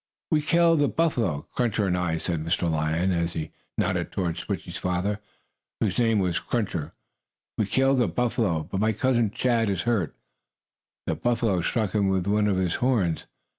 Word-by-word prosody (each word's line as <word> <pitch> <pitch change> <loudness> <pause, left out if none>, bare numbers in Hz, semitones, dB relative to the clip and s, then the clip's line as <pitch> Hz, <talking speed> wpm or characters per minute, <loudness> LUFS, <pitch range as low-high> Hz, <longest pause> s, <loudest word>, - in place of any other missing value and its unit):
"We 155 -2 +4
killed 165 0 +4
a 145 - +4
buffalo, 120 - 0
Cruncher 115 -4 0
and 90 -2 +1
I," 90 -2 0
said 80 -1 -2
Mr. 85 +2 0
Lion, 80 +3 +1
as 85 -1 0
he 80 -1 -4 0.3
nodded - - 0
toward 85 -3 -1
Switchie's - - -4
father, 90 +3 -1 0.6
whose - - 0
name 115 -2 +3
was 90 -3 +1
Cruncher. 90 -9 -2 0.6
"We 105 - 0
killed 135 +2 +3
a 120 - +3
buffalo, 110 -9 0
but 95 - -4
my 110 +2 +2
cousin, 120 -2 +2
Chaw, 120 +1 +1
is 95 -3 -1
hurt. 110 -9 0 0.9
The - - 0
buffalo 115 0 +1
stuck 110 +2 0
him 100 -2 +2
with 95 -2 +1
one 105 +1 +2
of 100 -2 +1
his 90 -2 +1
horns. 110 -11 +1
100 Hz, 170 wpm, -26 LUFS, 85-120 Hz, 0.9 s, We